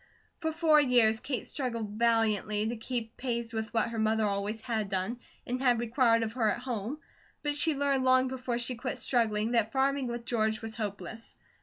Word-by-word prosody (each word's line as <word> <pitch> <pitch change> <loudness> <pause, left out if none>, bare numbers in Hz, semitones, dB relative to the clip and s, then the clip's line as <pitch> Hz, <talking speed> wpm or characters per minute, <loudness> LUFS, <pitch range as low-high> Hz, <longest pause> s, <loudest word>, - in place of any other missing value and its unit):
For 320 -1 -1
four 315 -2 +5
years, 240 -5 +4
Kate 260 0 -3
struggled 235 -6 -3
valiantly 215 -2 +1
to 235 - -2
keep 230 0 -4
pace 235 -2 -3
with 220 0 -3
what 225 -1 +1
her 230 -1 -4
mother 220 0 +2
always 205 +2 -1
had 220 -4 -2
done, 195 +5 -2 0.3
and 250 +1 -2
had 245 -3 +3
required 235 -1 +3
of 220 0 -3
her 230 -3 +2
at - - 0
home; 245 +1 -3 0.5
but 295 -1 0
she 310 +1 +2
learned 275 -1 +1
long 255 0 +4
before 255 -2 -3
she 240 +1 -2
quit 250 +2 -4
struggling 225 -3 +1
that 225 -2 +2
farming 270 0 +1
with 235 0 -5
George 220 -2 +1
was 225 -1 -7
hopeless. 210 0 -6
235 Hz, 190 wpm, -30 LUFS, 220-255 Hz, 0.5 s, four